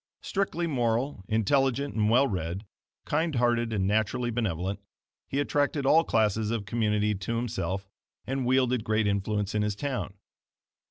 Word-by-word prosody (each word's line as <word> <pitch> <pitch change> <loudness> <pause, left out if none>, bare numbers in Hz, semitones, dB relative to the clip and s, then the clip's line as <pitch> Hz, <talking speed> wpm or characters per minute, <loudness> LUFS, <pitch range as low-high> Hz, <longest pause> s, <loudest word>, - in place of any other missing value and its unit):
Strictly 190 -3 -1
moral, 120 - 0
intelligent 135 +5 +1
and 105 -1 +2
well 125 +5 +5
read, 90 0 -3 0.4
kind 160 0 0
hearted 120 -1 +2
and 100 -4 0
naturally 110 +4 +1
benevolent, 100 -4 -2 0.5
he 140 - -1
attracted 145 0 0
all 160 +4 +6
classes 110 -4 +1
of 115 -3 -2
community 105 -1 +1
to 100 +4 -3
himself 100 -5 -2 0.4
and 135 0 -2
wielded 125 -2 +2
great 110 0 +1
influence 100 0 0
in 105 - +1
his 105 -1 0
town. 125 -4 -3
115 Hz, 145 wpm, -28 LUFS, 105-130 Hz, 0.5 s, all